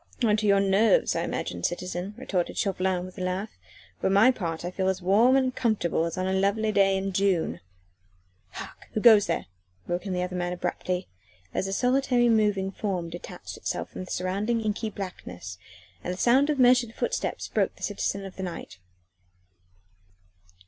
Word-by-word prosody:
"On 215 -3 +4
to 215 0 0
your 200 -1 +5
nerves, 200 - +3
I - - 0
imagine, - - -3
citizen," 180 +3 -3
retorted 195 -9 -2
Chauvelin 185 -2 0
with 185 0 -10
a - - -2
laugh; 185 +4 -2 0.5
"for - - +1
my 200 +6 +6
part 170 -8 -4
I 175 - -3
feel 190 0 -1
as 190 -1 +1
warm 210 +8 +4
and 260 -2 +2
comfortable 200 -8 +1
as 170 +2 -4
on 185 - -1
a 190 - 0
lovely 200 +3 +1
day 195 -1 +3
in 195 0 -3
June." 190 -3 +1 0.9
"Hark! - - -10
Who - - 0
goes 215 -2 +7
there?" 165 - -1 0.4
broke 175 +3 -3
in 190 - -2
the 180 0 0
other 180 0 -4
man 175 0 -1
abruptly, 180 +1 -3 0.5
as 190 - -1
a - - -3
solitary 250 +2 +2
moving 210 -4 +2
form 185 -5 -3
detached 175 - -8
itself - - -4
from 185 - -6
the - - -15
surrounding 200 +6 -1
inky 215 +1 -2
blackness 95 - -7 0.4
and - - -2
the 180 - -5
sound 260 +7 +4
of 300 - +1
measured 245 -2 +4
footsteps - - -2
broke - - 0
the - - -13
silence - - -1
of 190 - -10
the - - -5
night. 175 - -6
195 Hz, 180 wpm, -27 LUFS, 180-220 Hz, 0.9 s, goes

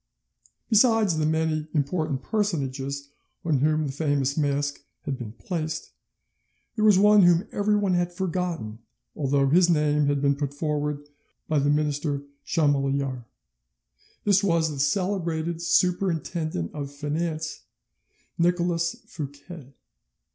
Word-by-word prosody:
Besides 220 -6 +4
the 155 - +1
many 160 -1 0
important 145 -2 -1
personages 140 -9 -2 0.4
on 155 -5 +2
whom 155 +2 +2
the 140 - -3
famous 145 -2 0
mask 145 -1 -1 0.2
had 140 - -2
been 110 -3 -7
placed, 160 +4 -4 0.8
there 215 - 0
was 210 -3 +6
one 210 +1 +6
whom 175 +2 +4
everyone 205 -2 +1
had 175 0 +1
forgotten, 175 - -3 0.4
although 140 -1 +1
his 175 +5 +4
name 150 -2 +2
had 145 0 +1
been 140 0 +2
put 140 0 -4
forward 150 -1 -2 0.4
by 155 -2 +2
the 140 +1 +1
minister 145 -1 0 0.2
Chamillart: 140 -4 0 1.0
this 200 -1 +3
was 165 -4 +2
the 145 - -6
celebrated 170 +1 -1
Superintendent 170 - 0
of 140 -2 -5
Finance, 155 +2 -3 0.8
Nicolas 170 -1 +1
Fouquet. 145 -1 -9
155 Hz, 120 wpm, -25 LUFS, 140-175 Hz, 1.0 s, was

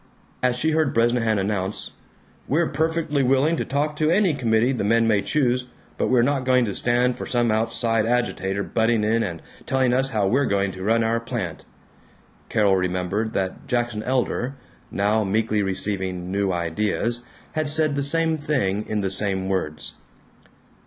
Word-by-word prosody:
As 125 -1 +2
she 160 +5 +1
heard 155 -3 +1
Bresnahan 115 -1 +2
announce, 100 0 -2 0.6
"We're 160 +4 +1
perfectly 160 -2 0
willing 135 +5 +3
to - - -2
talk 150 +2 -1
to 155 0 +2
any 185 -1 +3
committee 120 -2 +2
the 125 - -2
men 115 +2 +3
may 105 -3 +3
choose, 125 -3 0 0.3
but - - +1
we're 125 -2 +4
not 140 0 +1
going 125 -1 +3
to 100 - -3
stand 125 +2 +1
for - - -5
some 120 -2 +1
outside 115 0 0
agitator 100 -5 0
butting 115 0 +1
in 115 +2 +2
and 85 -7 -4 0.2
telling 130 -2 +2
us 135 +1 +1
how 105 -5 0
we're 130 +8 +2
going 100 -1 +1
to 95 - -9
run 115 +3 +2
our 115 +1 +1
plant!" 115 - -5 0.8
Carol 100 -3 +3
remembered 95 +4 -1
that 95 -1 -3
Jackson 120 -3 -1
Elder 125 +2 -1 0.3
(now 105 +2 +1
meekly 105 +1 +1
receiving 95 -2 -2
New 100 0 0
Ideas) 105 +7 -1 0.3
had 155 -1 -1
said 155 -1 +1
the 140 - 0
same 160 +2 0
thing 125 -9 0
in 105 -1 -1
the 95 -1 -1
same 95 -1 -2
words. 75 -6 -3
115 Hz, 165 wpm, -23 LUFS, 100-130 Hz, 0.8 s, we're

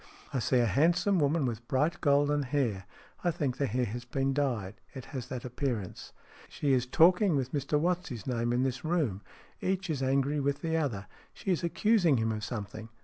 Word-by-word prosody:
" - - -22
I 135 - +1
see 130 +2 +2
a 120 - +4
handsome 175 - +3
woman 145 0 +2
with 120 -1 -4
bright 150 +4 0
golden 145 0 +3
hair. 125 -8 -1 0.4
I 175 - +2
think 150 -7 -1
the 140 - 0
hair 125 +2 0
has 120 +2 -5
been 135 +2 -1
dyed. 120 -9 -2
It 130 - -7
has 130 -3 -4
that 130 -1 -6
appearance. 125 -6 -4 0.4
She 140 -2 0
is 125 -1 +1
talking 180 +5 +5
with 130 -2 -1
Mr 145 +1 0
What's 180 +2 0
his 120 -6 -7
name 120 -2 -1
in 125 +1 +2
this 130 -1 -2
room. 155 - 0 0.4
Each 190 -1 -1
is 140 -4 -2
angry 135 +2 +1
with 140 0 -1
the 160 -1 -1
other. 125 -11 -1 0.3
She 195 - -2
is 175 - 0
accusing 175 - +3
him 115 0 0
of 110 -1 -4
something. 110 0 -6
135 Hz, 205 wpm, -30 LUFS, 120-155 Hz, 0.4 s, talking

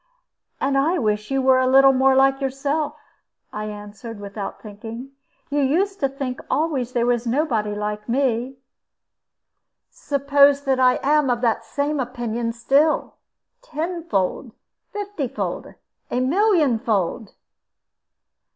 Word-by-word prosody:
"And 275 0 +1
I 325 +6 +2
wish 210 -5 -1
you 270 -1 0
were 260 0 +5
a 260 - +2
little 270 +1 +6
more 265 0 +4
like 270 +1 +3
yourself," 280 +3 -2 0.6
I 210 0 -4
answered, 210 +2 -8
without 200 0 -6
thinking; 225 +5 -9 0.4
"you 290 - +1
used 365 +9 +1
to 275 - +1
think 270 -2 -5
always 280 -6 -1
there 240 -2 +1
was 240 -1 0
nobody 230 -6 0
like 210 +1 -4
me." 255 0 0 1.3
"Suppose 280 0 +3
that 265 -2 +1
I 255 -1 +5
am 295 0 +3
of 240 -1 0
the 230 -2 +1
same 285 +5 -2
opinion 240 -2 -3
still? 275 +7 +1 0.5
Tenfold, 310 - -3 0.4
fiftyfold, 405 - -4 0.3
a 245 - -1
millionfold?" 255 - +1
260 Hz, 120 wpm, -22 LUFS, 230-285 Hz, 1.3 s, little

